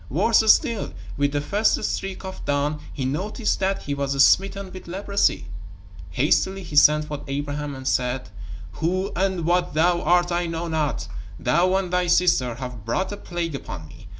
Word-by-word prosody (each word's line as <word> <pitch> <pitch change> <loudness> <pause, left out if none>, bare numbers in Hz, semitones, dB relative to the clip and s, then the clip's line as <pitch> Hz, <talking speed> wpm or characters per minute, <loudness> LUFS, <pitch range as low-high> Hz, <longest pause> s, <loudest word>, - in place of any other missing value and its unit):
Worse 225 -1 +4
still, 230 - 0 0.2
with 145 0 +1
the 145 0 -1
first 205 +8 +1
streak 195 0 -3
of 190 0 -7
dawn 145 +1 -1
he 130 - -4
noticed 200 - -1
that 195 0 -1
he 145 - -3
was 140 -1 -1
smitten 195 0 +1
with 185 - -10
leprosy. 195 - 0 0.6
Hastily 190 +8 +1
he 150 - -8
sent 150 +1 +6
for 150 -1 -6
Abraham 145 +1 -3
and 130 0 -7
said: 125 -4 -1 0.5
"Who 185 +4 -1
and 185 -2 0
what 175 -2 +1
thou 170 +2 +3
art 175 +1 +3
I 175 0 0
know 165 +1 -3
not. 150 - -1 0.3
Thou 175 +9 +2
and 190 -2 -1
thy 180 0 +2
sister 170 -9 +3
have 125 -3 -7
brought 180 - -1
a 205 - -5
plague 175 -4 -4
upon 80 - -7
me. 105 - -14
170 Hz, 175 wpm, -23 LUFS, 140-190 Hz, 0.6 s, sent